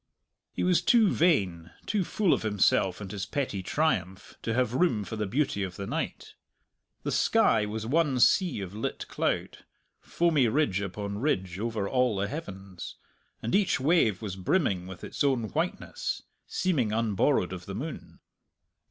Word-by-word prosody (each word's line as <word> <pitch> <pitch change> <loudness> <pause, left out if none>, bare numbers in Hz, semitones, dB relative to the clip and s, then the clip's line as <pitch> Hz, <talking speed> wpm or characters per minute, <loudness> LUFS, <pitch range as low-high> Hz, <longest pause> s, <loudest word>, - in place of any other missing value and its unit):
He - - -3
was 180 -1 +3
too 225 -4 +5
vain, 95 - +2 0.2
too 205 -3 0
full 190 +1 +2
of - - 0
himself 100 -3 +2
and 95 -2 -6
his 100 -3 -4
petty 130 -9 -2
triumph, 95 - -1
to 115 - -2
have 125 -2 +1
room 130 -7 +2
for 110 - -6
the 105 -2 -2
beauty 125 -1 0
of 95 -2 -3
the 100 - -5
night. - - -4 0.7
The - - -2
sky 105 -2 +3
was 110 +1 -4
one 140 0 +2
sea 165 - +3
of 95 -1 -6
lit 110 - -4
cloud, - - -2 0.4
foamy 160 -7 +2
ridge 110 -6 +1
upon 100 +1 -4
ridge 95 - -1
over 110 -3 -2
all 125 -2 +2
the 100 +1 -1
heavens, 95 - -7 0.5
and 115 - -2
each 200 -7 +3
wave 130 - +2
was 100 -3 -4
brimming 95 - 0
with 95 -1 -10
its - - -3
own 130 -6 +1
whiteness, - - -3 0.2
seeming 155 -12 0
unborrowed 110 -2 +1
of 90 -1 -8
the 95 - -5
moon. 145 +7 -7
110 Hz, 160 wpm, -28 LUFS, 95-145 Hz, 0.7 s, too